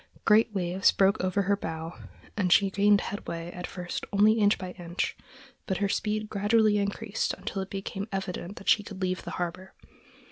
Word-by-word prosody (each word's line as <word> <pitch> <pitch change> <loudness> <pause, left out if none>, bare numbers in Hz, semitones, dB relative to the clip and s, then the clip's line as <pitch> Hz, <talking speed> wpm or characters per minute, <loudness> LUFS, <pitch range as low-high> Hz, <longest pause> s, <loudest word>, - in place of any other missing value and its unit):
Great 220 +1 +5
waves 185 -1 +2
broke 195 0 +2
over 185 +2 +1
her 200 +2 +2
bow 160 -2 -5 0.4
and 185 -4 0
she 195 +1 +5
gained 205 +1 +4
headway 170 -4 -5
at 180 0 -6
first 180 -1 -5
only 210 +2 +5
inch 205 0 +4
by 185 -1 -6
inch, 175 -1 -3 0.5
but 190 - 0
her 200 - +1
speed 215 +2 -1
gradually 210 +1 +3
increased 205 +1 -2
until 195 - -4
it 190 - -6
became 195 +1 -5
evident 190 0 -4
that - - -11
she 210 - +5
could 200 -2 -9
leave 185 -1 -1
the - - -7
harbor. 180 +2 -5
195 Hz, 180 wpm, -28 LUFS, 180-205 Hz, 0.5 s, Great